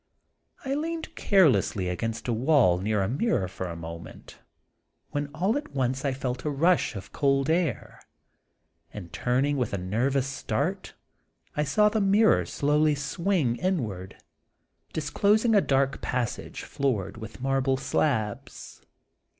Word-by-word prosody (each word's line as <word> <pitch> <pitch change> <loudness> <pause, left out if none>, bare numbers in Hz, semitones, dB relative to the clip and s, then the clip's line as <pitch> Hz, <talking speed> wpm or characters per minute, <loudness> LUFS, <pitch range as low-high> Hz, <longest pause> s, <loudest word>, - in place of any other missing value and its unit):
I 265 - -1
leaned 320 +3 -3
carelessly 150 - +3
against 115 +5 -3
the 120 - 0
wall 120 - +3
near 105 +1 0
a - - 0
mirror, 135 - 0
for 95 0 -6
a 85 - -6
moment, 85 0 -10 0.7
when 145 0 -2
all 175 +9 -1
at 290 - -7
once 130 0 0
I 140 - +1
felt 130 -1 -4
a 150 - -1
rush 165 0 +2
of 95 - -8
cold 135 +1 +1
air, 165 -7 -1 0.9
and 90 -5 -9
turning 135 +4 +1
with 125 -6 -1
a - - 0
nervous 120 +9 0
start 135 0 -3 0.6
I 150 - +1
saw 180 +9 +3
the 215 0 +1
mirror 200 +2 +4
slowly 150 +1 +2
swing 150 -3 0
in 185 -5 0
ward, 95 -3 -7 0.8
disclosing 205 +9 +2
a 205 - +6
dark 135 -2 +1
passage 125 -2 -3
floored 110 -8 -2
with 110 +2 -9
marble 135 0 +1
slabs. 125 -5 -2
135 Hz, 140 wpm, -27 LUFS, 110-160 Hz, 0.9 s, a